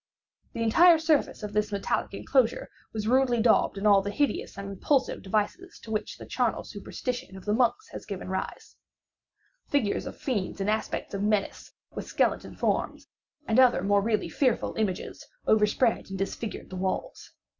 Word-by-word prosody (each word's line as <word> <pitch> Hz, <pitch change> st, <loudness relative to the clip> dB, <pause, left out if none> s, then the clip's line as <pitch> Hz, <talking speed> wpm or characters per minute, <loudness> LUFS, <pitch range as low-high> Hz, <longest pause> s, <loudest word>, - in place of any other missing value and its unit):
The 230 Hz, -, -2 dB
entire 335 Hz, +10 st, +6 dB
surface 315 Hz, -7 st, +1 dB
of 210 Hz, 0 st, -5 dB
this 210 Hz, 0 st, 0 dB
metallic 200 Hz, 0 st, -1 dB
enclosure 255 Hz, +1 st, +1 dB, 0.2 s
was 215 Hz, -1 st, -3 dB
rudely 250 Hz, -1 st, +3 dB
daubed 220 Hz, -3 st, +3 dB
in 195 Hz, -, -3 dB
all 200 Hz, -2 st, +6 dB
the 200 Hz, -, -4 dB
hideous 285 Hz, +1 st, -1 dB
and 200 Hz, 0 st, -6 dB
repulsive 255 Hz, +8 st, 0 dB
devices 215 Hz, -, -2 dB
to 220 Hz, -, -9 dB
which 215 Hz, -1 st, -3 dB
the -, -, -9 dB
charnel -, -, 0 dB
superstition 245 Hz, -6 st, -5 dB
of 190 Hz, -, -12 dB
the 210 Hz, -, +1 dB
monks 255 Hz, -, +1 dB
has -, -, -9 dB
given -, -, -6 dB
rise. -, -, -5 dB, 0.9 s
The -, -, -39 dB
figures 240 Hz, -8 st, +1 dB
of -, -, -8 dB
fiends 205 Hz, -10 st, -2 dB
in 195 Hz, +1 st, 0 dB
aspects 215 Hz, -1 st, -2 dB
of 200 Hz, -, -2 dB
menace, 210 Hz, -1 st, -1 dB, 0.2 s
with -, -, -6 dB
skeleton -, -, 0 dB
forms, -, -, -1 dB, 0.4 s
and 225 Hz, +3 st, +3 dB
other 250 Hz, -8 st, +5 dB
more 200 Hz, 0 st, +3 dB
really 215 Hz, 0 st, 0 dB
fearful 255 Hz, -5 st, 0 dB
images, 205 Hz, -5 st, -3 dB, 0.2 s
overspread 220 Hz, +2 st, +2 dB
and 190 Hz, -, -5 dB
disfigured 195 Hz, +3 st, -4 dB
the 185 Hz, -, -5 dB
walls. 190 Hz, +1 st, -3 dB
215 Hz, 170 wpm, -27 LUFS, 200-250 Hz, 0.9 s, entire